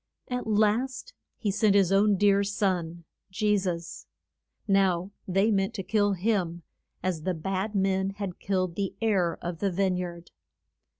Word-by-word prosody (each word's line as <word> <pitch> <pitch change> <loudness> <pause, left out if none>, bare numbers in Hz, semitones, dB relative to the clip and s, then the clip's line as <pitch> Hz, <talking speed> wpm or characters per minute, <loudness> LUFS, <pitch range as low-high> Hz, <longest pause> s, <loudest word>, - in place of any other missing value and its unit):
At 250 -1 -3
last 225 - +1 0.2
he 205 - -1
sent 205 0 +3
his 195 -2 +4
own 200 +1 +4
dear 200 0 +4
son, 180 -4 -1 0.3
Je 210 +2 +1
sus. 175 -4 -3 0.6
Now 190 -2 +2 0.2
they 195 +4 +2
meant 195 +2 0
to 195 - -3
kill 205 0 +2
him, 180 -4 -1 0.4
as 180 -4 -1
the 185 +2 -1
bad 195 +5 -3
men 190 0 +1
had 200 -3 -5
killed 185 -3 -1
the 195 +1 -3
heir 195 -7 +1
of 170 -1 -4
the 200 -2 0
vine 185 0 +1
yard. 175 -1 -6
195 Hz, 155 wpm, -27 LUFS, 180-205 Hz, 0.6 s, his